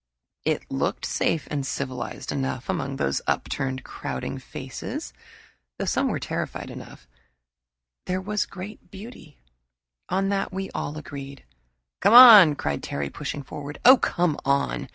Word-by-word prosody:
It - - -1
looked - - -1
safe 155 -5 -1
and 145 -2 -1
civilized 130 -2 -4
enough, 130 -2 -3
and - - +1
among 135 0 -4
those 70 - -1
upturned, 130 -1 -2
crowding 65 -1 -5
faces, - - -7 0.6
though - - -3
some - - +1
were - - -1
terrified - - -4
enough, 65 - -11 1.0
there 185 +1 -1
was 210 +2 -2
great 195 0 -10
beauty 195 - -12 0.7
on 195 +2 0
that 200 -1 -1
we 190 0 -5
all 150 - -4
agreed. 140 -2 -9 0.6
"Come 225 - +4
on!" 215 -11 +11
cried 70 - -3
Terry, 70 0 -4
pushing 145 -1 -5
forward. 145 +1 -8
"Oh, 255 +2 +10
come 175 -9 0
on! 140 0 0
145 Hz, 140 wpm, -25 LUFS, 135-190 Hz, 1.0 s, on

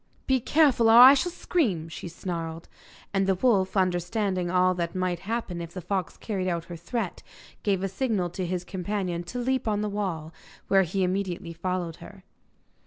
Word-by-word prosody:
'Be 265 -1 +2
careful, 260 -4 +4
or 225 - +7
I 255 +2 +11
shall 350 +6 0
scream,' 215 - 0
she 165 +2 -7
snarled. 165 -1 -5 0.5
And 195 -1 +1
the 190 - +3
wolf, 195 -3 +2
understanding 185 0 0
all 185 0 +3
that 170 0 -3
might 185 -2 -1
happen 195 -4 -3
if 170 +1 -8
the - - -3
fox 185 +1 -3
carried 190 -4 -2
out 170 -1 -2
her 175 - -8
threat, 180 +4 -4 0.4
gave 195 -2 0
a - - +1
signal 195 -4 -1
to 185 - -4
his 180 0 -2
companion 185 -2 -3
to 245 - -6
leap 255 0 -1
on 210 -1 +1
the 210 - -1
wall, 175 -6 -3 0.4
where 195 -1 +5
he 190 +2 0
immediately 180 -2 -2
followed 175 -1 -3
her. 195 -2 -13
185 Hz, 180 wpm, -27 LUFS, 175-210 Hz, 0.5 s, I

